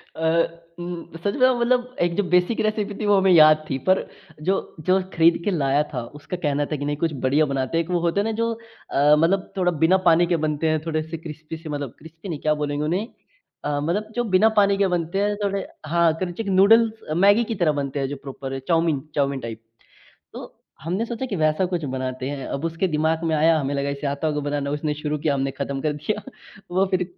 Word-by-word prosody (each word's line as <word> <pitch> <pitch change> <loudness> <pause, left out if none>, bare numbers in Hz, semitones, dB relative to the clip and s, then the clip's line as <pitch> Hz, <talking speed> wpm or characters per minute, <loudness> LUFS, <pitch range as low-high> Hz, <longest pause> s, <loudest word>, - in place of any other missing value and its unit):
अ, 165 +1 +1 0.2
उम 175 -1 -7
सच 200 +5 -2
बताऊ 255 -2 +3
मतलब 250 +1 +1
1 175 0 +1
जो 205 - +1
बेसिक 180 +5 +3
रेसिपी 215 -1 -1
थी 215 - -2
वो 205 -1 +4
हमें 190 -1 +4
याद 155 -2 +6
थी 135 - -1
पर 185 - +3 0.3
जो, 190 +5 -1
जो 185 +5 +2
खरीद 165 +1 +4
के 205 - +2
लाया 145 -4 +2
था 125 -3 -3 0.2
उसका 180 +5 -6
कहना 145 -3 0
था 150 - -3
कि 145 - -4
नहीं 145 0 -2
कुछ 165 -2 +1
बढ़िया 145 +4 +3
बनाते 135 +4 -1
हैं 165 - +2
एक - - -16
वो 175 - +2
होता 170 +4 +1
है - - -2
ना 225 - 0
जो 230 0 +1 0.4
अ, 145 +2 +5
मतलब 180 +5 +1
थोड़ा 180 -1 +2
बिना 185 +3 +5
पानी 170 +1 +5
के 175 - +2
बनते 155 +1 0
हैं 155 0 +1
थोड़े-से 160 0 -3
क्रिस्पी 155 0 -8
से, 160 0 -10
मतलब 145 -4 -4
क्रिस्पी 165 +4 -11
नहीं, 155 -4 -4
क्या 155 +1 +1
बोलेंगे 145 0 -2
उन्हें? 185 +8 -1 0.6
अ, 145 -1 0
मतलब 205 +8 -2
जो 240 - +1
बिना 215 +4 +6
पानी 200 -1 +3
के 200 -1 +3
बनते 175 +2 -1
हैं 205 0 +1
थोड़े 200 -1 -1 0.2
हाँ, 170 0 +3
क्रंचिक 185 +4 -4
नूडल्स 215 +4 +5 0.3
मैगी 205 +4 +5
की - - -1
तरह 175 -5 +2
बनते 140 +1 -4
हैं 135 - -1
जो 145 - -4
प्रोपर 135 0 -6
चाउमीन 165 -4 +2 0.2
चाउमीन 140 -2 0
टाइप। 115 -2 -7 0.7
तो - - -9 0.3
हमने 180 +8 -1
सोचा 235 +2 -4
कि 205 - -3
वैसा 155 +2 +2
कुछ 175 -3 -3
बनाते 130 0 -3
हैं। 140 -2 -5
अब 140 - -4
उसके 165 +3 0
दिमाग 160 +1 0
में 160 -1 +1
आया 160 +1 +4
हमें 140 -1 -2
लगा 140 0 -1
इसे 140 +1 -4
आता 140 +3 -2
होगा 150 -1 -1
बनाना 145 -1 -2
उसने 150 +1 -1
शुरू 150 0 -1
किया 145 0 0
हमने 135 0 -1
ख़त्म 140 0 -2
कर 150 +1 0
दिया। 150 +9 -3 0.5
वो 190 +2 +2
फ़िर 185 -1 +1
165 Hz, 225 wpm, -23 LUFS, 145-190 Hz, 0.7 s, याद